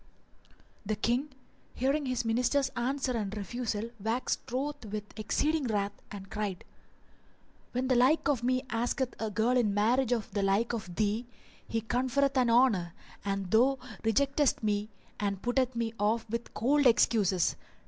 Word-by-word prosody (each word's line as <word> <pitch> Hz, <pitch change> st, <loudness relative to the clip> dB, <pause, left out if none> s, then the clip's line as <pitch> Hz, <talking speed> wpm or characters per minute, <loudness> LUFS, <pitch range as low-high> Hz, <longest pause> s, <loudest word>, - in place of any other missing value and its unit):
The 215 Hz, +1 st, -1 dB
King, 240 Hz, +7 st, 0 dB, 0.5 s
hearing 275 Hz, +3 st, 0 dB
his 250 Hz, -2 st, -1 dB
Minister's 250 Hz, +4 st, +2 dB
answer 265 Hz, +1 st, -1 dB
and 215 Hz, -3 st, -2 dB
refusal, 225 Hz, +1 st, -3 dB
waxed 225 Hz, +3 st, -2 dB
wroth 285 Hz, +3 st, -2 dB
with 210 Hz, 0 st, -4 dB
exceeding 290 Hz, +8 st, 0 dB
wrath 205 Hz, -2 st, 0 dB, 0.2 s
and 195 Hz, -1 st, -9 dB
cried, 205 Hz, -4 st, -3 dB, 1.1 s
'When 255 Hz, +1 st, 0 dB
the 260 Hz, -, +3 dB
like 255 Hz, +6 st, +4 dB
of 275 Hz, -5 st, +1 dB
me 255 Hz, +1 st, +1 dB
asketh 245 Hz, +2 st, -1 dB
a 220 Hz, -, -1 dB
girl 225 Hz, +4 st, +1 dB
in 215 Hz, -5 st, +2 dB
marriage 240 Hz, +4 st, +2 dB
of 230 Hz, -4 st, -1 dB
the 205 Hz, -, -1 dB
like 195 Hz, +5 st, +1 dB
of 210 Hz, -7 st, -5 dB
thee, 220 Hz, +3 st, 0 dB, 0.4 s
he 225 Hz, -, -1 dB
conferreth 260 Hz, +4 st, +1 dB
an 250 Hz, -2 st, +3 dB
honour, 225 Hz, -9 st, +3 dB, 0.3 s
and 195 Hz, -2 st, -2 dB
thou 255 Hz, +5 st, +4 dB, 0.3 s
rejectest 275 Hz, +4 st, +2 dB
me 210 Hz, 0 st, 0 dB, 0.3 s
and 200 Hz, -2 st, -2 dB
puttest 250 Hz, +1 st, +1 dB
me 230 Hz, -1 st, -1 dB
off 220 Hz, +3 st, +1 dB
with 235 Hz, 0 st, -3 dB
cold 285 Hz, +6 st, +3 dB
[FN#402] 275 Hz, -, +6 dB
excuses! 205 Hz, -6 st, +3 dB
235 Hz, 155 wpm, -30 LUFS, 210-255 Hz, 1.1 s, FN#402